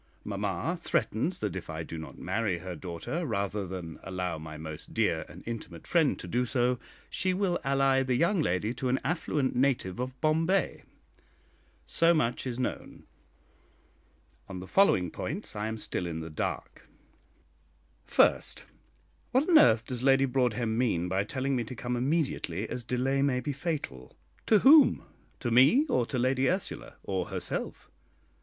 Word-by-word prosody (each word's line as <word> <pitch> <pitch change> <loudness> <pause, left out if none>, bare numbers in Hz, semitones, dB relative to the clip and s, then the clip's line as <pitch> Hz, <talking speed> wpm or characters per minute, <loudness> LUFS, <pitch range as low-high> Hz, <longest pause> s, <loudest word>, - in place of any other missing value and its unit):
Mamma - - -2
threatens 140 - 0
that 105 -4 -2
if 95 - -6
I 80 0 -4
do 80 - -8
not 80 -1 -8
marry 110 -6 -1
her 90 +1 -6
daughter, 90 - -4
rather 100 - -2
than 85 -3 -7
allow 90 -3 -3
my 80 0 -8
most 80 -1 -8
dear - - +1
and - - -12
intimate 110 -8 -7
friend 160 -5 +2
to - - -8
do 125 +1 +1
so, 125 0 +1 0.3
she 185 -1 -1
will 185 -2 0
ally 135 -1 +3
the 130 -1 0
young 170 +7 +2
lady 105 - 0
to 130 0 -2
an 130 - +2
affluent 150 -3 -1
native 125 -7 +1
of 130 +1 -4
Bombay. 165 +5 +1 1.0
So 170 +1 +3
much 130 -3 0
is 120 -2 -3
known. 125 - -4 1.5
On 95 -1 -6
the 90 - -7
following 95 - +3
points 180 - -5
I 105 +1 -2
am 110 0 -3
still 90 -4 -2
in 80 -1 -4
the 80 0 -7
dark: 75 - -5 1.1
First, - - +2 0.6
What 260 +4 +2
on 335 -4 +7
earth 110 0 +5
does 125 -2 -5
Lady 135 +1 +4
Broadhem 120 -3 0
mean 90 -8 +1
by 95 +2 +1
telling 130 +5 -2
me 120 - 0
to 125 - -7
come 120 +1 -3
immediately, 130 - -1
as 125 - -5
delay 130 +3 0
may 135 -2 +2
be 140 +3 -3
fatal? 140 - -5 0.3
to 220 - +6
whom? 290 +7 +7 0.4
to 120 - -1
me 135 - +6
or 120 -2 +1
to 130 - -3
Lady 130 +2 +2
Ursula, 185 +1 -3
or 95 -2 -2
herself? - - -4
125 Hz, 165 wpm, -29 LUFS, 95-140 Hz, 1.5 s, on